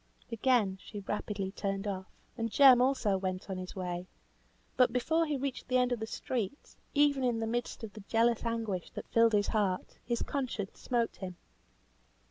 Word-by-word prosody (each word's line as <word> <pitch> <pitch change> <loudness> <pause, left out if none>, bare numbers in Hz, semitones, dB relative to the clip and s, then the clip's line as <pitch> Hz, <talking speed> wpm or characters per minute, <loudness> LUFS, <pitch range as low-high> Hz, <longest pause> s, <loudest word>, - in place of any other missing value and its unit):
Again 225 -4 +2
she 205 -2 -8
rapidly 200 -1 -3
turned 195 0 -3
off, 190 -2 -3 0.3
and 230 -1 -2
Jem 260 0 +8
also 245 -7 +2
went 185 +1 -3
on 190 - -3
his 185 0 -7
way. 180 -1 -4 0.7
But 250 -2 +5
before 320 +7 +1
he 295 -2 0
reached 270 -1 -4
the 255 - +3
end 250 0 +2
of 245 - 0
the 220 - -4
street, 240 +2 -4 0.2
even 285 -2 +4
in 240 -2 +1
the 225 - -1
midst 235 +1 -3
of 215 -2 -6
the 215 - -9
jealous 230 0 +2
anguish 225 -6 -2
that - - -5
filled 230 -1 +4
his 205 -1 +3
heart, 200 -4 -1
his 235 -1 -1
conscience 245 -8 -3
smote 235 -2 0
him. 185 -2 -6
225 Hz, 180 wpm, -32 LUFS, 195-250 Hz, 0.7 s, Jem